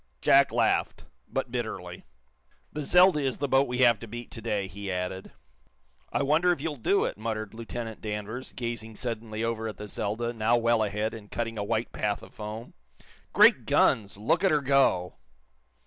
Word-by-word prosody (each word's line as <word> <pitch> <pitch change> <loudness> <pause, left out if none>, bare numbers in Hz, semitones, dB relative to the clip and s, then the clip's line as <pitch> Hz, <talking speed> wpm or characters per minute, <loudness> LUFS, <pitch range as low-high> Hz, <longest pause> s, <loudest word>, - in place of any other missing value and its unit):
Jack 140 - +5
laughed, - - 0 0.2
but - - -3
bitterly. - - -5 0.7
"The 150 - -3
'Zelda' 180 +2 +5
is 135 -3 -1
the 145 - -1
boat 135 +1 +3
we 125 0 -3
have 120 -4 +5
to 115 - -9
beat 120 +2 -8
today," 105 -3 -2
he 100 0 -6
added. 90 +1 -4 0.8
"I - - 0
wonder 160 +6 +3
if 175 - -1
you'll 150 +1 -3
do 195 - +2
it?" - - -4
muttered 110 -1 -4
Lieutenant 115 0 -6
Danvers, 110 +4 -5
gazing 115 -2 -5
suddenly 115 -2 -4
over 115 -1 -2
at 110 - -6
the 105 - -7
"Zelda," 110 +4 -3
now 115 +1 +2
well 115 -1 +2
ahead 105 +1 -1
and 105 -2 -10
cutting 115 -2 -3
a - - -1
white 110 +2 -1
path 105 -1 -2
of - - -14
foam. 110 +2 -7 0.6
"Great - - +5
guns, 100 -3 +2
look 110 - +1
at 190 - +5
her 150 -3 +2
go!" 135 -10 +2
115 Hz, 180 wpm, -27 LUFS, 105-130 Hz, 0.8 s, Jack